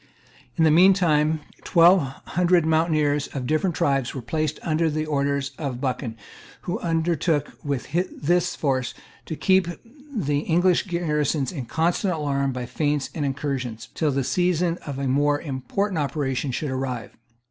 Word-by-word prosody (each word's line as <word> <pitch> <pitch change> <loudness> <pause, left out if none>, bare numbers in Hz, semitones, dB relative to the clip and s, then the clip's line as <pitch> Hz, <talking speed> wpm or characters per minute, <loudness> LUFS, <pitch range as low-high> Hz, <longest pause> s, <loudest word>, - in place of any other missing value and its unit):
In 165 - +3
the 160 - +5
mean 185 +5 +7
time 155 -4 +2 0.2
twelve 175 +2 +6
hundred 170 +5 +1
mountaineers 155 -3 +2
of 130 -2 -3
different 155 +5 0
tribes 135 -4 0
were 130 - -4
placed 155 +6 -2
under 160 0 +1
the 155 0 -2
orders 140 -2 0
of 135 -6 -3
Buchan, 125 -3 -3 0.4
who 175 - -3
undertook, 165 -2 0
with 140 -3 -2 0.2
this 175 +3 0
force, 130 -4 -1 0.3
to 160 - -3
keep 190 +2 +3 0.4
the 150 - 0
English 175 +5 +2
garrisons 150 -5 0
in 135 -9 -6
constant 175 +3 0
alarm 140 -3 0
by 125 -1 -4
feints 145 +2 -1
and 155 - -3
incursions, 135 -5 -3
till 155 - 0
the 135 0 0
season 175 +2 +1
for 145 -5 -7
more 145 +2 +2
important 160 +7 -2
operations 135 -3 -1
should 150 -3 -3
arrive. 130 -2 -4
150 Hz, 145 wpm, -24 LUFS, 140-170 Hz, 0.4 s, mean